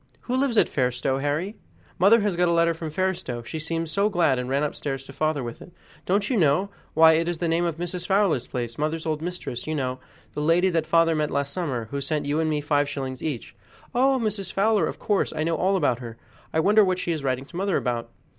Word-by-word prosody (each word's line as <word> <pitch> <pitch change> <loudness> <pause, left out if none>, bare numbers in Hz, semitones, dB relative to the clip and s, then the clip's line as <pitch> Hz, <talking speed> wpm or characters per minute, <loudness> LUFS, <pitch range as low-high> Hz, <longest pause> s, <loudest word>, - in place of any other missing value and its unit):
"Who 250 - -2
lives 260 -3 +1
at - - +5
Fairstowe, 130 0 0
Harry? 155 +9 -2 0.4
Mother 205 +5 +6
has 205 -3 0
got 175 +1 +2
a - - +2
letter 170 0 +3
from 165 -1 -6
Fairstowe; 155 -8 -2
she 160 +7 -5
seemed 165 +1 -2
so 200 +6 +1
glad, 165 -9 +2
and 125 0 -4
ran 140 +2 +1
upstairs 135 -2 -3
to - - -12
father 155 -3 0
with 120 -1 -7
it." - - -12 0.4
"Don't 200 +2 +2
you 255 - 0
know? 180 +4 +2 0.2
Why, 160 0 +7
it 165 +1 +1
is 175 -1 -1
the 170 - -1
name 165 +1 +1
of 165 -2 -2
Mrs. 175 +1 -4
Fowler's 195 - +2
place 120 -1 -4
mother's 155 +2 -1
old 155 -1 -1
mistress, 170 -8 -5
you 155 - -1
know 130 -3 -2 0.3
the 150 - -3
lady 170 +4 +3
that 165 -2 0
father 165 0 +4
met 155 -1 0
last 140 0 -2
summer, 135 -11 -2
who 140 - -2
sent 150 +2 -2
you 145 +2 0
and 160 -1 +1
me 150 -1 0
five 145 -1 +1
shillings 130 -3 -5
each." 145 -7 -4 0.4
"Oh! 265 +2 +3
Mrs. 205 -5 -2
Fowler. 210 +1 +2
Of - - -5
course, 205 -2 0
I 155 - 0
know 165 +1 0
all 190 +5 +1
about 145 -9 +1
her. 115 -2 -8 0.3
I 160 - +1
wonder 210 +5 +5
what 185 -2 +1
she 175 - -2
is 155 -4 -3
writing 130 0 -1
to 170 - -15
mother 195 +1 +1
about." 120 -2 -2
160 Hz, 240 wpm, -25 LUFS, 140-185 Hz, 0.4 s, Why